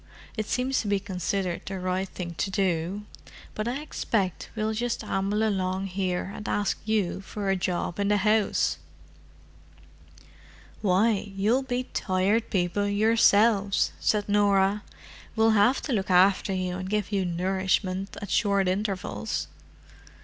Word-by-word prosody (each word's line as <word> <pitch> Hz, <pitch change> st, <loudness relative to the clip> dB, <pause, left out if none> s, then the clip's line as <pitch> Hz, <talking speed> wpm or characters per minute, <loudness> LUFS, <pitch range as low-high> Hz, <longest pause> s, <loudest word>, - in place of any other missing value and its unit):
It 215 Hz, -2 st, -3 dB
seems 255 Hz, +1 st, 0 dB
to 215 Hz, -, -6 dB
be 200 Hz, -1 st, +2 dB
considered 185 Hz, -2 st, -2 dB
the 195 Hz, -1 st, -4 dB
right 185 Hz, +1 st, -2 dB
thing 175 Hz, -2 st, -6 dB
to 195 Hz, -, 0 dB
do. 190 Hz, 0 st, -1 dB, 0.5 s
But 215 Hz, +1 st, -3 dB
I 255 Hz, +4 st, -2 dB
expect 205 Hz, -, -2 dB
we'll 220 Hz, 0 st, -1 dB
just 235 Hz, +2 st, -2 dB
amble 205 Hz, +3 st, 0 dB
along 190 Hz, -1 st, -1 dB
here 185 Hz, -1 st, -1 dB
and 210 Hz, -, -6 dB
ask 205 Hz, -1 st, 0 dB
you 210 Hz, -4 st, 0 dB
for 200 Hz, -1 st, -3 dB
a -, -, +2 dB
job 180 Hz, 0 st, -2 dB
in 200 Hz, -, +1 dB
the 210 Hz, 0 st, +3 dB
house!" 210 Hz, +1 st, +2 dB, 2.0 s
"Why, 205 Hz, +1 st, +2 dB
you'll 215 Hz, +7 st, +2 dB
be 255 Hz, -1 st, -2 dB
Tired 200 Hz, +4 st, +1 dB
People 190 Hz, +1 st, 0 dB
yourselves," 205 Hz, -1 st, +3 dB
said 210 Hz, -1 st, +1 dB
Norah. 205 Hz, 0 st, +3 dB, 0.5 s
"We'll 225 Hz, 0 st, +4 dB
have 220 Hz, +5 st, +3 dB
to 275 Hz, -, -2 dB
look 195 Hz, -4 st, -1 dB
after 185 Hz, +2 st, +4 dB
you 185 Hz, -1 st, -2 dB
and 185 Hz, 0 st, -5 dB
give 210 Hz, 0 st, -1 dB
you 195 Hz, -2 st, +1 dB
nourishment 185 Hz, +2 st, -1 dB
at 205 Hz, -, -6 dB
short 200 Hz, -3 st, +2 dB
intervals." 195 Hz, +1 st, -2 dB
200 Hz, 140 wpm, -27 LUFS, 185-215 Hz, 2.0 s, We'll